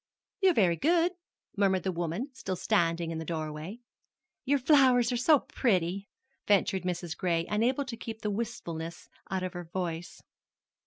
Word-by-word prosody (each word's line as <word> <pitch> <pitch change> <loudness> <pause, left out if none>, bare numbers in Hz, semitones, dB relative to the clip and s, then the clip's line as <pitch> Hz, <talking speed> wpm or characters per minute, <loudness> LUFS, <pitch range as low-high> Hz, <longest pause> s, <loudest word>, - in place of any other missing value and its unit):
"You're 380 -4 +4
very 175 -6 +3
good," 340 - +3 0.4
murmured 195 -3 +2
the 190 - 0
woman, 175 - -3
still 190 -7 -4
standing 170 -4 +1
in 160 - -3
the - - -4
doorway. 160 +6 -5 0.6
"Your 285 +2 +3
flowers 255 -3 +5
are - - 0
so 275 +4 +4
pretty," 195 - 0 0.4
ventured 195 -2 +3
Mrs. 175 -2 -3
Gray, 170 -2 0
unable 245 +6 +1
to 255 -3 -5
keep 225 -1 -8
the 210 - 0
wistfulness 170 -7 -5 0.2
out 190 -1 -1
of 185 - -3
her 175 -1 -6
voice. 170 -1 -5
190 Hz, 155 wpm, -29 LUFS, 170-245 Hz, 0.6 s, flowers